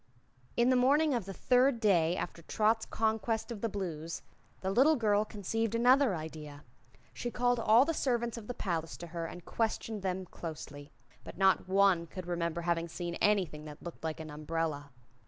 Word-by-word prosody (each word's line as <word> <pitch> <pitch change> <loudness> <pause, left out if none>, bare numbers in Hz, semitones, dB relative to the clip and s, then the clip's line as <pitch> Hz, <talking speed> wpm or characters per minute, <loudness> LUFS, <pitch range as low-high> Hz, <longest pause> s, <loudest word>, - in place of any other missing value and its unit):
In 240 +2 +4
the - - +4
morning 285 +4 +4
of 235 -6 -1
the 195 - -6
third 250 +4 +3
day 175 -6 +3
after 170 - -5
Trot's 220 +6 +1
conquest 220 +1 -1
of 215 -4 -6
the 230 - 0
Blues 170 -5 -5 0.4
the 190 - -1
little 275 +9 +5
girl 210 -4 +2
conceived 220 +2 -2
another 250 -1 +4
idea. 155 -2 -8 0.5
She 240 - -4
called 245 0 +1
all 230 +3 +5
the 330 - 0
servants 240 -5 0
of 225 -3 -8
the 245 - -4
palace 165 -4 -3
to 175 - -7
her 165 -1 -3
and 175 +1 -10
questioned 225 -1 -2
them 185 0 -2
closely. 150 -4 -8 0.3
But - - -10
not 190 -1 +3
one 190 -3 +4
could 185 +1 -8
remember 170 -1 -2
having 170 0 0
seen 170 +1 -5
anything 185 -7 +1
that 150 -1 -10
looked 170 -2 -9
like 160 -1 -3
an 155 -1 -7
umbrella. 150 -1 -3
195 Hz, 180 wpm, -32 LUFS, 165-230 Hz, 0.5 s, little